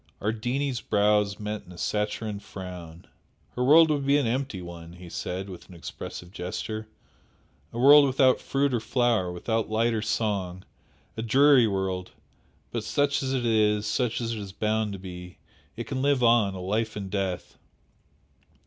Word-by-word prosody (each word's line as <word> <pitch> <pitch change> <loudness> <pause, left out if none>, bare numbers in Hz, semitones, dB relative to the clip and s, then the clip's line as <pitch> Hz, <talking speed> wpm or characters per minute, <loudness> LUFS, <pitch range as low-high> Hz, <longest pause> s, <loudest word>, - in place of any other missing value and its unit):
Ardini's 120 +5 -1
brows 105 -1 +2
met 105 0 -4
in - - -12
a 90 - -12
saturnine 105 +1 -2
frown. 90 -4 -9 0.5
"Her 125 - -2
world 155 +4 +7
will 145 - +1
be 140 +1 +3
an 145 - +1
empty 125 -3 -2
one!" 85 -1 -9
he 90 0 -11
said, 95 +3 -4
with 95 -1 -11
an 90 - -12
expressive 85 +1 -8
gesture 110 +4 -5 0.8
"A - - -8
world 140 +3 +8
without 130 -1 +3
fruit 140 -1 0
or 120 - +2
flower, 115 -6 +1
without 110 +6 -2
light 115 +2 +1
or 110 - -1
song! 100 -4 -2 0.5
A - - -2
dreary 130 +1 +5
world! 95 -2 -2 0.6
But 115 -2 -3
such 140 +5 +1
as 135 -1 -2
it 130 -2 -1
is, 105 -2 +2
such 120 +2 0
as 115 -1 -2
it 110 - -4
is 100 -2 -7
bound 110 0 -1
to - - -5
be, 90 -1 -9 0.4
it - - -5
can 130 - -3
live 140 -2 +2
on, 115 -5 +4
a - - -6
life 105 +4 -2
in 100 -2 -5
death." 95 -3 -3
110 Hz, 170 wpm, -26 LUFS, 95-125 Hz, 0.8 s, world